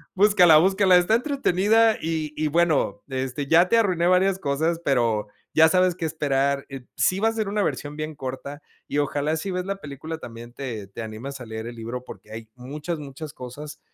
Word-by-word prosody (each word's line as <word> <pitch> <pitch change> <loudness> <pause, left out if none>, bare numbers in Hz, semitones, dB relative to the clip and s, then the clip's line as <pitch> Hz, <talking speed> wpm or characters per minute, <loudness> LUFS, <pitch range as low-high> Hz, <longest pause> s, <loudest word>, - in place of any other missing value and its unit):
búscala 185 -5 +6
búscala, 190 +2 +5
está 180 +5 +3
entretenida 225 - +2
y 160 -2 -2
y 155 - 0
bueno, 150 - +1
este, 130 +1 -3
ya 170 +4 +5
te 230 - +4
arruiné 185 -6 +2
varias 185 +1 +3
cosas, 160 +3 -1
pero, 115 -7 +1 0.3
ya 160 0 +6
sabes 185 0 +3
que 180 - -7
esperar, 140 -3 0
eh, 135 -2 -8
sí 185 - +2
va 220 - +2
a - - -1
ser 220 -2 -2
una 205 +1 0
versión 145 -5 -3
bien 155 0 -5
corta 140 +1 -6 0.3
y - - -3
ojalá 145 +2 0
si 195 +5 -4
ves 180 0 -2
la 195 0 -3
película 155 -1 -7
también, 120 -4 -10
te 115 -7 -6
te 100 - -8
animas 115 +6 -7
a - - -7
leer 110 0 -6
el 120 - -8
libro 120 +2 -6
porque 110 - -12
hay 110 0 -8
muchas 150 +6 -5
muchas 145 +1 -8
cosas, 140 +4 -9
150 Hz, 200 wpm, -24 LUFS, 130-180 Hz, 0.3 s, búscala